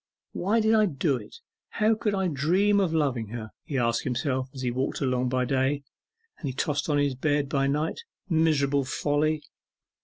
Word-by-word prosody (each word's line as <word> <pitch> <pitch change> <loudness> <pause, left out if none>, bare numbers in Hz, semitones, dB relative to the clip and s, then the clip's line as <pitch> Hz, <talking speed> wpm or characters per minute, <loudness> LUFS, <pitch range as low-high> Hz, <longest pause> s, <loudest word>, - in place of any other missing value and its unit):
'Why 205 +6 +1
did 220 0 +3
I 215 -1 +5
do 140 -3 0
it? - - -11 0.3
how 220 0 +2
could 210 -2 -1
I 190 -1 +1
dream 180 +8 +2
of 190 -4 +1
loving 135 -8 0
her?' 110 0 -7
he 140 - -3
asked 115 -1 +1
himself 130 +1 -1
as 130 -1 -7
he 125 - 0
walked 130 +3 -2 0.3
by 130 0 +1
day, 135 +2 0 0.6
as - - -22
he 135 -3 -2
tossed 145 +3 -1
on 145 - +2
his 145 -1 +2
bed 145 +2 0
by 135 -1 +1
night: 150 +3 -1 0.3
'miserable 150 -5 +2
folly! 150 +3 0
145 Hz, 180 wpm, -27 LUFS, 130-165 Hz, 0.6 s, I